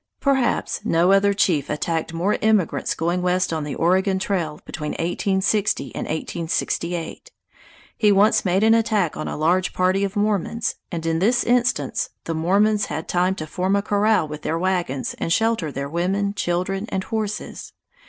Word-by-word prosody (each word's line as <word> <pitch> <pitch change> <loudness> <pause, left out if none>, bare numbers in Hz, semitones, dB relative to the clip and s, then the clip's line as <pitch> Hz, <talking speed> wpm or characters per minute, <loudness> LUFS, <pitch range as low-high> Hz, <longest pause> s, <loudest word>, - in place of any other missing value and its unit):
Perhaps 265 -6 0
no 175 -3 +3
other 195 +1 +4
chief 170 -8 +1
attacked 160 +1 -2
more 175 +5 0
emigrants 215 -5 +1
going 170 +2 -1
west 180 -1 +1
on 160 -1 -2
the 145 -2 -4
Oregon 190 +3 +2
Trail 175 -6 -2
between 150 -2 -5
1860 190 +4 0
and - - -4
1868. 170 - -3 0.7
He 210 -2 +3
once 205 +3 +4
made 190 +2 +1
an 225 0 +5
attack 215 -7 +1
on - - -4
a - - -4
large 175 +4 +1
party 185 +2 +1
of 200 +1 -2
Mormons, 210 +2 0 0.2
and 165 -2 -4
in 165 0 0
this 230 +7 +2
instance 245 +1 +1
the 165 - -3
Mormons 200 +6 +2
had 155 +2 -5
time 180 +2 +1
to 155 - -5
form 185 +5 -1
a 200 - +1
corral 210 -4 +2
with 150 0 -7
their 160 - -1
wagons 175 -7 -1
and 165 - -2
shelter 220 -6 +1
their 140 +1 -4
women, 190 +6 -1
children, 195 +1 -2
and 190 - -2
horses. 215 -1 -4
185 Hz, 165 wpm, -22 LUFS, 165-205 Hz, 0.7 s, an